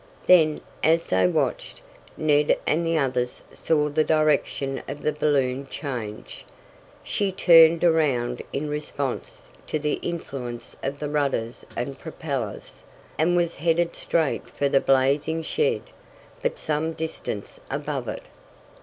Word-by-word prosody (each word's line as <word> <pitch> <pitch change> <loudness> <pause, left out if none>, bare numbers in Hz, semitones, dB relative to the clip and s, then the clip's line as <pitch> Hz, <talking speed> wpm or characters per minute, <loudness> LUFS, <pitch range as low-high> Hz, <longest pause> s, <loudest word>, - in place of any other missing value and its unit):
Then, 160 -4 +5 0.2
as 165 +1 +3
they 95 0 +3
watched, - - -1 0.4
Ned 150 -1 +3
and 165 +3 +1
the 165 0 +1
others 125 -4 -1
saw 150 -2 +1
the 150 +1 +2
direction 150 -3 +1
of 140 +2 -6
the 150 - +1
balloon 140 -3 0
change. 120 -8 -6 0.6
She 200 -2 -1
turned 165 -3 +6
around 135 -8 +2
in 145 +2 -2
response 145 -3 -4 0.2
to - - -1
the 150 0 -1
influence 135 -8 -5
of 140 +1 -3
the 150 - -4
rudders 140 -6 -1
and 135 +2 -4
propellers, 140 -9 -5 0.4
and 170 +3 +3
was 170 -1 +1
headed 170 +2 +1
straight 160 -4 -1
for 140 - -1
the 135 0 +3
blazing 140 +5 +2
shed, 460 - +1 0.6
but - - -1
some 155 +1 -1
distance 160 -10 -5
above - - -3
it. - - -5
150 Hz, 130 wpm, -25 LUFS, 135-160 Hz, 0.6 s, turned